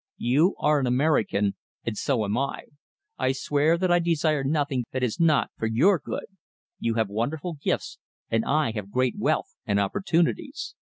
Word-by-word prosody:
You 145 Hz, +10 st, +2 dB
are 150 Hz, 0 st, +3 dB
an 130 Hz, -, 0 dB
American, 125 Hz, -7 st, +2 dB, 0.3 s
and 115 Hz, -, -2 dB
so 115 Hz, -1 st, 0 dB
am 100 Hz, +2 st, -1 dB
I. 135 Hz, +3 st, -2 dB, 0.6 s
I 130 Hz, -, +2 dB
swear 145 Hz, +4 st, +2 dB
that 185 Hz, 0 st, +1 dB
I 175 Hz, -, +5 dB
desire 155 Hz, -4 st, +1 dB
nothing 140 Hz, -3 st, 0 dB
that 130 Hz, -1 st, -1 dB
is 120 Hz, -4 st, -1 dB
not 160 Hz, -4 st, +3 dB
for 110 Hz, -, 0 dB
your 160 Hz, -, +4 dB
good. 145 Hz, -, -5 dB, 0.5 s
You 115 Hz, -1 st, -1 dB
have 110 Hz, -2 st, +1 dB
wonderful 140 Hz, -, -3 dB
gifts, -, -, -2 dB, 0.3 s
and 115 Hz, 0 st, +1 dB
I 150 Hz, -4 st, +1 dB
have 105 Hz, -3 st, -5 dB
great 125 Hz, +2 st, +1 dB
wealth -, -, 0 dB
and 100 Hz, -1 st, +1 dB
opportunities. 195 Hz, -, -1 dB
140 Hz, 170 wpm, -26 LUFS, 115-160 Hz, 0.6 s, I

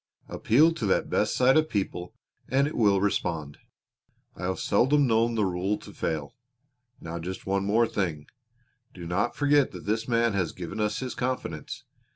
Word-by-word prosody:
Appeal 150 Hz, +9 st, +3 dB
to 120 Hz, -10 st, -3 dB
that 95 Hz, -, +1 dB
best -, -, +1 dB
side 130 Hz, +3 st, +4 dB
of 155 Hz, 0 st, +2 dB
people 90 Hz, -3 st, -3 dB, 0.3 s
and 135 Hz, +2 st, +3 dB
it 150 Hz, -, -4 dB
will 100 Hz, -4 st, +3 dB
respond. 80 Hz, -7 st, -2 dB, 0.8 s
I 90 Hz, -, -6 dB
have 95 Hz, 0 st, -2 dB
seldom 145 Hz, +3 st, +3 dB
known 115 Hz, -1 st, +2 dB
the 105 Hz, -2 st, +2 dB
rule 95 Hz, +3 st, -1 dB
to -, -, -13 dB
fail. 75 Hz, -3 st, -3 dB, 0.7 s
Now 85 Hz, +1 st, -6 dB
just 90 Hz, +3 st, -6 dB
one 100 Hz, 0 st, 0 dB, 0.2 s
thing 90 Hz, -6 st, -1 dB
more. 75 Hz, -, -16 dB, 0.7 s
Do 90 Hz, -2 st, -8 dB
not 95 Hz, +8 st, -1 dB
forget 145 Hz, -1 st, +3 dB
that -, -, -9 dB
this 110 Hz, +2 st, -1 dB
man 115 Hz, -2 st, +2 dB
has 90 Hz, -5 st, -1 dB
given 90 Hz, +4 st, -7 dB
us 105 Hz, +2 st, -1 dB
his 130 Hz, -1 st, -4 dB
confidence. 125 Hz, -, -4 dB
105 Hz, 175 wpm, -27 LUFS, 90-125 Hz, 0.8 s, side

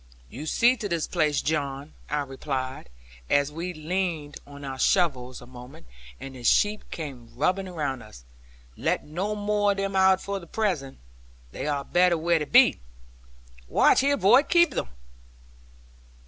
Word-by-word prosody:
'You 145 Hz, +7 st, -7 dB
see 240 Hz, +9 st, +4 dB
to 210 Hz, -4 st, -4 dB
this 170 Hz, -3 st, -1 dB
place, 150 Hz, -4 st, 0 dB
John,' 145 Hz, -1 st, -2 dB, 0.2 s
I 150 Hz, -, 0 dB
replied, 135 Hz, 0 st, -5 dB, 0.4 s
as 145 Hz, 0 st, +2 dB
we 170 Hz, +4 st, -4 dB
leaned 160 Hz, -2 st, -3 dB
on 140 Hz, 0 st, -10 dB
our 135 Hz, -1 st, -6 dB
shovels 130 Hz, -9 st, +1 dB
a -, -, -11 dB
moment, 125 Hz, +1 st, -13 dB, 0.3 s
and 135 Hz, -, -8 dB
the 125 Hz, -2 st, -11 dB
sheep 210 Hz, -, +2 dB
came 135 Hz, -8 st, -7 dB
rubbing 185 Hz, +7 st, 0 dB
round 145 Hz, -7 st, -3 dB
us; 65 Hz, -, -14 dB, 0.5 s
'let -, -, -1 dB
no 190 Hz, +8 st, -3 dB
more 205 Hz, 0 st, +1 dB
of -, -, -11 dB
them 195 Hz, 0 st, -2 dB
out 190 Hz, 0 st, +5 dB
for 200 Hz, 0 st, -4 dB
the 170 Hz, -, -13 dB
present; 170 Hz, -11 st, -2 dB, 0.5 s
they -, -, -5 dB
are 140 Hz, -2 st, -1 dB
better 180 Hz, -1 st, +3 dB
where 170 Hz, +1 st, +2 dB
they 150 Hz, -, -2 dB
be. -, -, +5 dB, 0.9 s
Watch, -, -, +4 dB
here 280 Hz, +1 st, +2 dB
boy, 215 Hz, +8 st, +6 dB
keep 345 Hz, +1 st, +3 dB
them!' -, -, -3 dB
155 Hz, 160 wpm, -26 LUFS, 140-190 Hz, 0.9 s, boy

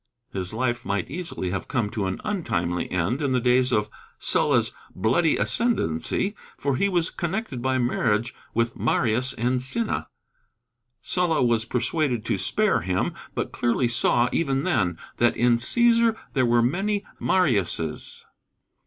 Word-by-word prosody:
His 95 Hz, -2 st, -3 dB
life 120 Hz, +2 st, -1 dB
might 100 Hz, +2 st, -2 dB
easily 165 Hz, -, -4 dB
have 95 Hz, -3 st, -3 dB
come 110 Hz, -5 st, -1 dB
to 100 Hz, -4 st, -2 dB
an 95 Hz, -, -3 dB
untimely 95 Hz, -, -1 dB
end 90 Hz, -, -1 dB
in 140 Hz, -3 st, 0 dB
the 125 Hz, -, +3 dB
days 125 Hz, +1 st, +3 dB
of 105 Hz, -3 st, +2 dB, 0.3 s
Sulla's -, -, +2 dB, 0.2 s
bloody 130 Hz, -, +2 dB
ascendency, 205 Hz, -, 0 dB, 0.2 s
for 140 Hz, -1 st, 0 dB
he 200 Hz, +9 st, +1 dB
was 175 Hz, -3 st, +1 dB
connected 170 Hz, -, -3 dB
by 130 Hz, +1 st, +1 dB
marriage 120 Hz, -2 st, 0 dB, 0.2 s
with 115 Hz, 0 st, +1 dB
Marius 120 Hz, +2 st, +1 dB
and 125 Hz, +2 st, 0 dB
Cinna. 220 Hz, -, -2 dB, 1.0 s
Sulla 175 Hz, -6 st, +1 dB
was 115 Hz, -2 st, +2 dB
persuaded 125 Hz, -1 st, -1 dB
to 100 Hz, -, 0 dB
spare 210 Hz, -, +2 dB
him, 90 Hz, +2 st, -1 dB, 0.2 s
but -, -, -2 dB
clearly 120 Hz, +1 st, +1 dB
saw, 120 Hz, 0 st, +2 dB
even 135 Hz, -4 st, 0 dB
then, 90 Hz, -8 st, +1 dB, 0.2 s
that 120 Hz, 0 st, +2 dB
"in 120 Hz, 0 st, +4 dB
Cæsar 230 Hz, -, +3 dB, 0.2 s
there 130 Hz, -3 st, +2 dB
were 120 Hz, 0 st, +4 dB
many 200 Hz, -, 0 dB
Mariuses." 100 Hz, -, 0 dB
125 Hz, 145 wpm, -25 LUFS, 110-165 Hz, 1.0 s, in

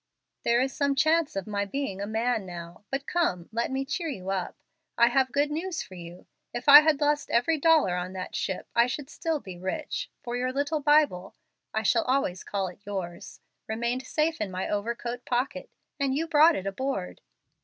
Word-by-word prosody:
There 235 Hz, 0 st, +3 dB
is 265 Hz, +1 st, -1 dB
some 280 Hz, -1 st, +1 dB
chance 315 Hz, 0 st, +2 dB
of 195 Hz, -2 st, -2 dB
my 205 Hz, -1 st, -1 dB
being 200 Hz, -2 st, -3 dB
a 200 Hz, -, -3 dB
man 225 Hz, 0 st, 0 dB
now. 175 Hz, +1 st, -9 dB
But 275 Hz, +1 st, -3 dB
come, 235 Hz, -, 0 dB
let 230 Hz, +1 st, -1 dB
me 270 Hz, +1 st, -2 dB
cheer 335 Hz, +5 st, -3 dB
you 190 Hz, -8 st, -4 dB
up. 185 Hz, -2 st, -3 dB, 0.4 s
I 235 Hz, 0 st, +6 dB
have 260 Hz, +1 st, +2 dB
good 290 Hz, +2 st, +1 dB
news 330 Hz, +3 st, -3 dB
for 190 Hz, -, -14 dB
you. 175 Hz, 0 st, -10 dB, 0.3 s
If 240 Hz, +3 st, -5 dB
I 290 Hz, +1 st, +12 dB
had 305 Hz, -2 st, +2 dB
lost 295 Hz, 0 st, +1 dB
every 295 Hz, +7 st, +2 dB
dollar 315 Hz, -, +4 dB
on 180 Hz, +1 st, -4 dB
that 185 Hz, -1 st, -6 dB
ship 190 Hz, -, -3 dB
I 235 Hz, +1 st, +4 dB
should 270 Hz, +2 st, -5 dB
still 325 Hz, -3 st, -2 dB
be 185 Hz, -8 st, -10 dB
rich, 185 Hz, +1 st, -3 dB
for 240 Hz, 0 st, -4 dB
your 250 Hz, +1 st, -1 dB
little 290 Hz, +3 st, -1 dB
Bible 295 Hz, -11 st, +2 dB, 0.4 s
(I 220 Hz, -, -1 dB
shall 230 Hz, +2 st, +3 dB
always 250 Hz, -9 st, 0 dB
call 195 Hz, -2 st, -2 dB
it 180 Hz, -, -10 dB
yours) 185 Hz, -4 st, -6 dB, 0.3 s
remained 235 Hz, +4 st, -2 dB
safe 310 Hz, -3 st, 0 dB
in 210 Hz, -, -1 dB
my 185 Hz, 0 st, -3 dB
overcoat 235 Hz, +3 st, -3 dB
pocket, 250 Hz, +2 st, -2 dB, 0.3 s
and 275 Hz, -1 st, +1 dB
you 325 Hz, -, 0 dB
brought 320 Hz, 0 st, +5 dB
it 190 Hz, -, -4 dB
aboard. 195 Hz, -, -3 dB
245 Hz, 195 wpm, -27 LUFS, 195-290 Hz, 0.4 s, I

